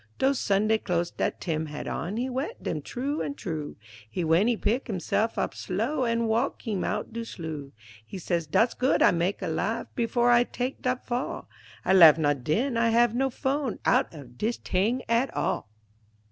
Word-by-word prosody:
Dose 270 0 +2
Sunday 215 +2 +2
close 175 -3 -1
dat - - -2
Tim 160 -2 -2
had 150 0 -6
on 195 +6 -3
He 250 +2 -1
wet 265 - -4
dem - - -2
t'roo 280 +4 -3
an' 285 - -4
t'roo, 160 - -5 0.4
An' 180 - 0
w'en 165 +6 +3
he 240 -2 +2
pick 235 +7 0
himse'f 220 +2 -1
op - - -1
slow 230 +9 -1
An' 230 0 +1
walk 230 +5 0
heem 210 -6 -2
out 210 +1 -3
de 230 0 -3
sloo, 160 -9 -7 0.3
He 150 - -8
say, 175 -1 -1
"Dat's 230 +9 +3
good 260 +2 +2
I - - +6
mak' 175 +3 -1
a - - -1
laugh - - -1
Before 240 0 +2
I 240 0 +6
tak' 250 +2 -4
dat 255 0 -1
fall; 245 +1 -3 0.4
I 190 - +3
laugh 165 -5 +9
not 145 -4 0
den, 230 - 0
I 230 0 +3
hav' 235 0 +4
no 265 +2 +1
fone 265 0 -2
Out - - +3
of 130 -6 -12
dis 230 +2 0
t'ing 220 +8 0
at 235 +4 +2
all." - - -1
225 Hz, 195 wpm, -27 LUFS, 175-250 Hz, 0.4 s, laugh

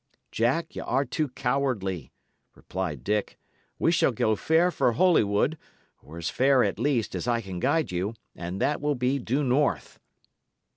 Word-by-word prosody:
"Jack, 135 +9 0
y' - - -4
are 135 +2 0
too 150 +4 -1
cowardly," 125 - -2 0.4
replied 85 -8 -5
Dick. 105 0 -1 0.4
"We - - +2
shall - - +3
go 110 - +1
fair 165 +8 +2
for 120 - +1
Holywood, 145 - +2 0.4
or 80 +3 -12
as 85 -1 -4
fair, 130 +3 +3
at 100 0 -1
least, 120 -4 0
as - - -4
I 120 -1 +2
can 95 -5 -6
guide 160 - +1
you, 95 +5 -2 0.2
and 90 +3 -5
that 145 +7 0
will 145 0 0
be 130 +2 0
due 130 +4 -1
north." 140 +2 0
120 Hz, 160 wpm, -26 LUFS, 100-140 Hz, 0.4 s, shall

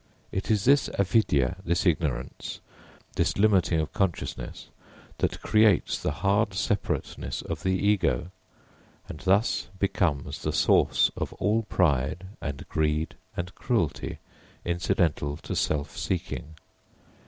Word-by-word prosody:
It 95 - -3
is 105 -3 +2
this 140 +2 +5
Avidyā, 95 - +2
this 85 +1 0
ignorance, 75 -8 -1 0.6
this - - +1
limiting 95 -5 +3
of 80 - -2
consciousness 95 -4 -2 0.5
that - - -1
creates 110 -3 +3
the - - 0
hard 100 0 +2
separateness 100 +1 -2
of - - -4
the 95 - +1
ego, 100 -3 +1 0.8
and 75 - -8
thus 100 +6 +2
becomes 90 -7 0
the - - -1
source - - +4
of - - -4
all 110 +2 +1
pride 80 +1 +1 0.2
and 70 -2 -5
greed 75 0 0 0.2
and 90 +1 -3
cruelty 110 - -1 0.5
incidental 85 -4 0
to - - -5
self 75 -2 -1
seeking. 80 +2 -3
90 Hz, 120 wpm, -27 LUFS, 75-100 Hz, 0.8 s, this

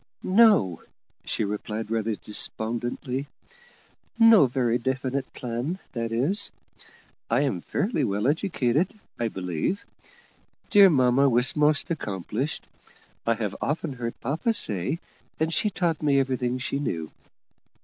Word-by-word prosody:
"No," 190 - +4 0.4
she - - -1
replied 105 +1 -4
rather 110 -1 0
despondently: 120 +6 -2 0.9
"no 225 - +7
very 125 -1 0
definite 130 +1 -2
plan, 125 +8 -4 0.2
that 115 -2 -3
is. 155 - +1 0.8
I 120 +4 +2
am 130 -12 -1
fairly 195 - -1
well 105 -2 -1
educated, 155 - +1 0.3
I 120 - 0
believe. 90 - -3 0.9
Dear 200 -2 +8
mamma 135 -2 +4
was 125 +1 +4
most 150 +1 +3
accomplished, 110 - -3 0.6
I 115 - +3
have 105 -3 -3
often 150 0 -2
heard 120 -2 -5
papa 160 - 0
say, 105 - +1 0.4
and 160 +1 0
she 210 - +2
taught 175 -5 -1
me 140 -2 +3
everything 130 -2 -1
she 140 +2 -3
knew. 80 - -3
130 Hz, 120 wpm, -25 LUFS, 115-155 Hz, 0.9 s, Dear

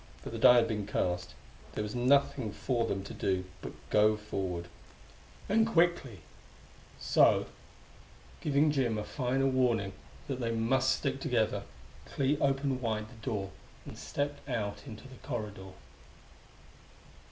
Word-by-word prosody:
But - - -6
the - - -4
die 125 - +8
had 120 -1 +5
been 105 -3 -3
cast; 90 -3 -1 0.4
there 105 - -2
was 105 0 -5
nothing 130 -2 +2
for 120 +1 -1
them 95 -2 -2
to 100 - -8
do 95 -1 -1 0.2
but - - -6 0.2
go 105 0 +5
forward 95 -5 -4 0.8
and 220 +2 +3
quickly; 170 - +1 0.8
so, - - +4 1.0
giving 150 +1 +3
Jim 125 -6 +1
a 105 - -2
final 135 +3 0
warning 120 -7 +1 0.3
that 135 -3 -3
they 115 -2 -1
must 120 +4 +2
stick 135 -2 -2
together, 110 -8 0 0.4
Clee 140 +1 +1
opened 135 -1 +1
wide 110 -2 -2
the 115 -3 -15
door 100 -3 -2 0.3
and - - -8
stepped 145 0 -4
out 110 0 -3
into 110 +2 -9
the 130 -1 -13
corridor. 105 -4 -5
120 Hz, 140 wpm, -31 LUFS, 105-135 Hz, 1.0 s, die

